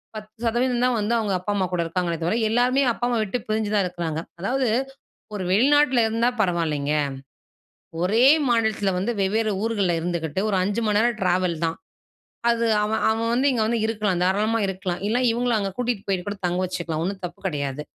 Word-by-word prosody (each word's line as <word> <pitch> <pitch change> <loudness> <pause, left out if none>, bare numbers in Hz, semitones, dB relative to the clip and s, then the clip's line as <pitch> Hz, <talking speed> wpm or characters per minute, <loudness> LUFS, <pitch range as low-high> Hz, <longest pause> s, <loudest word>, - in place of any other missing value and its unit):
10 215 0 -9
சதவீதந்தான் 245 +1 +1
வந்து 210 +3 0
அவுங்க 210 -3 -1
அப்பா, 185 +3 -3
அம்மா 190 -2 +1
கூட 175 - +1
இருக்காங்களே! 170 -1 -2
தவிர 175 +7 +1 0.2
எல்லாருமே 250 +4 +3
அப்பா, 240 - -3
அம்மாவ 240 -2 +1
விட்டு 215 +4 -3
பிரிஞ்சுதான் 215 -2 +1
இருக்கிறாங்க, 165 -3 -4 0.2
அதாவது 255 +5 0 0.7
ஒரு 195 - -3
வெளிநாட்டில 265 +3 +4
இருந்தா 230 +2 +1
பரவாயில்லேங்க, 160 -7 0 1.1
ஒரே 215 +7 +3 0.3
மாநிலத்தில 220 -4 +1
வந்து 205 +6 -1
வெவ்வேறு 215 +3 +1
ஊர்கள்ல 205 -6 +1
இருந்துக்கிட்டு 170 0 -2
ஒரு 195 - +1
5 205 +4 -1
மணி 210 -1 +2
நேரம் 235 0 +1
ட்ராவல் 180 -2 +1
தான், 165 0 -2 0.7
அது 235 0 +1 0.2
அவன், 215 +1 -1
அவன் 230 +1 -1
வந்து 265 +4 +3
இங்க 230 -3 +1
வந்து 235 +1 0
இருக்கலாம் 205 -5 -1
தாராளமா 210 +5 +1
இருக்கலாம். 185 -2 -4
இல்ல 225 +3 +1
இவுங்களும் 240 0 +1
அங்க 195 -1 -2
கூட்டிட்டு 245 -5 -2
போயிட்டு 190 -2 -1
கூட 205 0 -3
தங்க 180 +1 0
வச்சுக்கலாம். 165 -3 -3
1 190 0 -4
தப்பு 175 -1 -9
கிடையாது. 145 -3 -3
205 Hz, 175 wpm, -23 LUFS, 180-230 Hz, 1.1 s, வெளிநாட்டில